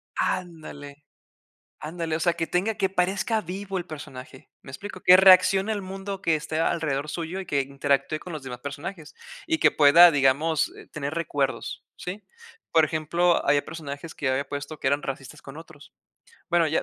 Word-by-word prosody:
Ándale. 155 -5 -4 0.8
Ándale. 160 +1 -4
O 160 - -2
sea, 170 +1 +2
que 165 -1 -3
tenga 200 +5 0
que 190 - 0
parezca 195 +4 0
vivo 195 +2 -5
el 175 - -4
personaje, 130 -4 -10
¿me 130 - -12
explico? 185 +5 -8
Que 180 +1 +8
reaccione 190 +2 +6
el 205 - -2
mundo 195 +1 -6
que 165 -1 +2
esté 155 +1 -3
alrededor 150 -3 -1
suyo, 170 +3 -4
y 190 - -6
que 140 -4 0
interactúe 140 +2 -1
con 180 - -9
los 150 - -6
demás 125 -2 -7
personajes, 145 +4 -7 0.3
y 325 -1 0
que - - +5
pueda, 155 +4 +8
digamos, 145 +2 +2
eh, - - -13
tener 145 -1 -5
recuerdos, 145 -4 -2
¿sí? 190 +4 -7 0.5
Por 160 -1 +5
ejemplo, 165 +3 +1
había 145 0 +3
personajes 155 0 -8
que 135 - -1
había 130 +1 -1
puesto, 145 +2 -6
que - - -1
eran 145 +2 +1
racistas 135 -1 -7
con 135 +2 -11
otros. 155 -3 -14 0.6
Bueno, 170 -1 +3
ya 160 - 0
160 Hz, 180 wpm, -25 LUFS, 145-180 Hz, 0.8 s, Que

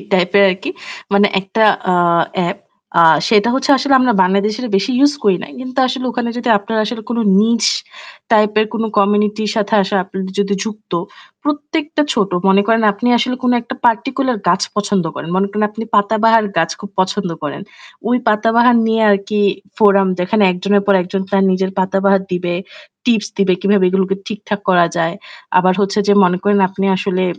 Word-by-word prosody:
টাইপের 185 +2 +3
আরকি 195 - -5 0.4
মানে 200 +1 +4
একটা 195 +4 -2 0.3
আ - - +2 0.6
এপ। 200 - -7 0.4
আ - - +7 0.3
সেটা 220 0 +3
হচ্ছে 270 +2 -1
আসলে 270 +1 +1
আমরা 250 -1 +2
বাংলাদেশের 205 +6 0
বেশি 195 +5 -1
ইউজ 285 +2 +4
করি 200 -3 +3
নাই। - - -10
কিন্তু 255 +1 -7
আসলে 255 0 -4
ওখানে 240 0 -3
যদি 245 - -4
আপনারা 220 +2 -3
আসলে 225 +1 -5
কোন 235 - -2 0.2
niche 230 +1 +2 0.6
টাইপের 215 0 +3
কোন 225 - -2 0.2
কমিউনিটির 210 +1 +1
সাথে 215 0 0
আসা 195 +1 -2
আপনার 190 0 -7 0.2
যদি 200 0 0
যুক্ত, 215 -2 -9 0.5
প্রত্যেকটা 300 +1 -2
ছোট; 205 -5 0 0.2
মনে 195 +1 +4
করেন 225 0 +2
আপনি 205 +5 -3
আসলে 250 +2 -1
কোন 250 -1 +2
একটা 250 +3 -8
particular 255 +3 0
গাছ 175 +3 +2
পছন্দ 205 -3 0
করেন। 160 - -7
মনে 195 +1 +1
করেন 210 +1 -1
আপনি 225 +2 -7
পাতা 205 +2 +2
বাহার 225 -1 +4
গাছ 165 0 +1
খুব 205 - -9
পছন্দ 190 0 -2
করেন। 150 +5 -5 0.5
ওই 245 - +2
পাতা 215 +1 +1
বাহার 240 0 +5
নিয়ে 225 0 +1
আরকি 200 +1 0 0.4
forum 200 -3 +4
যেখানে 185 +4 0
একজনের 200 +3 0
পর 200 - +4
একজন 190 +2 -4
তার 195 -1 +2
নিজের 190 0 -1
পাতা 190 +1 0
বাহার 195 -1 +3
দিবে, 175 -1 -2 0.5
টিপস 220 -4 +1
দিবে 195 -2 +2
কিভাবে 200 0 +2
এগুলোকে 190 +1 0
ঠিকঠাক 210 -1 -5
করা 175 -2 +4
যায়। 165 0 -1 0.4
আবার 185 0 +3
হচ্ছে 200 +1 0
যে - - +5
মনে 180 0 +1
করেন 205 0 +2
আপনি 195 +1 -3
আসলে 185 -1 -1
205 Hz, 180 wpm, -16 LUFS, 195-230 Hz, 0.6 s, আ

